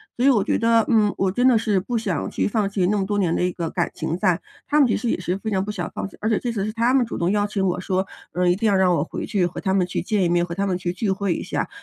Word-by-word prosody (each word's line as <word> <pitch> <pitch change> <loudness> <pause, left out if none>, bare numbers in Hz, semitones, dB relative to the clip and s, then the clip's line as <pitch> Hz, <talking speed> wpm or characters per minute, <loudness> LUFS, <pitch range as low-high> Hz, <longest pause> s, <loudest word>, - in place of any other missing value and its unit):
所 245 - 0
以 - - +7
我 225 -7 +3
觉 - - 0
得， 230 -1 +3
嗯， 215 -3 +3
我 190 -1 +1
真 245 +6 +2
的 250 -3 +5
是 215 -3 +1
不 235 +6 -2
想 200 -7 -2
去 - - -1
放 210 -1 0
弃 195 -2 0
那 210 +2 +1
么 195 - 0
多 205 +1 -1
年 180 -5 +1
的 - - 0
一 180 0 0
个 170 -2 -3
感 175 0 -1
情 165 - -3
在。 185 -2 +2 0.3
她 295 - +1
们 295 - +6
其 225 - +1
实 240 - -2
也 - - +1
是 180 +1 -2
非 220 +2 -4
常 190 -3 0
不 210 - -4
想 185 -4 -4
放 - - -3
弃， - - -17
而 215 - -1
且 220 - +2
这 240 - -2
次 205 -4 -2
是 215 - -4
她 230 +2 +2
们 265 -2 +3
主 - - -6
动 170 +2 +1
邀 205 0 +1
请 200 -2 -1
我 180 -1 0
说， 190 +1 -1 0.3
呃， 180 +1 0
一 - - +5
定 225 +2 +1
要 205 - +3
让 190 -1 +3
我 145 - +1
回 - - -5
去 190 -4 +1
和 175 - -5
她 190 -2 0
们 185 -2 +2
去 180 - -2
见 200 0 0
一 - - +3
面、 175 0 +2
和 170 - -6
她 200 +3 -1
们 185 -2 0
去 180 -1 -2
聚 190 +4 -2
会 190 -1 0
一 - - -4
下。 - - -3
195 Hz, 370 characters per minute, -22 LUFS, 180-220 Hz, 0.3 s, 以